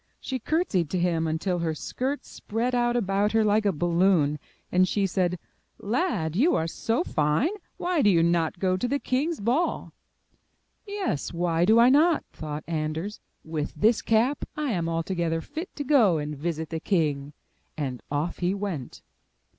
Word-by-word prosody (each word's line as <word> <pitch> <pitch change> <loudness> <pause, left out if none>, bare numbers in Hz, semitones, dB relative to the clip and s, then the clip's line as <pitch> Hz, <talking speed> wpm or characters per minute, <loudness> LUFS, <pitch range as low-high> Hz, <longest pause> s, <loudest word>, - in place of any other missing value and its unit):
She 260 -1 -4
curtsied 225 - 0
to 185 - -1
him 170 -2 +1
until 175 +3 -1
her 165 -2 -1
skirts 265 - -3
spread 235 +4 -3
out 240 0 +2
about 205 -2 +1
her 225 0 +4
Hke 210 0 +2
a - - +4
balloon 170 -3 +2 0.3
and 185 +1 +4
she 200 0 +1
said: 180 -1 0 0.4
*'Lad, 205 - -1
you 285 - +3
are 160 - +1
so 225 - -1
fine, 150 - +1 0.3
why 350 -3 0
do 210 - +5
you 170 -4 +4
not 170 0 +1
go 185 0 +1
to 245 - -1
the 280 - +1
king's 285 +5 -1
ball?'* 250 +11 0 0.9
*'Yes, 400 - -2
why 170 0 +1
do 220 +4 +5
I 235 +2 +7
not?'' 310 +4 +4
thought 155 0 -6
Anders. 160 +5 -3 0.2
'With 155 -2 -4
this 215 +9 +3
cap, 235 +6 +2
I 300 -4 -1
am 170 -5 -1
altogether 165 0 -1
fit 315 - -6
to 290 - -3
go 240 - +4
and 150 0 -4
visit 160 +1 -3
the 160 - -2
king." 150 -6 0 0.4
And 130 -6 -3
off 150 +4 -2
he 180 +2 0
went. 195 -10 -5
185 Hz, 170 wpm, -26 LUFS, 160-240 Hz, 0.9 s, I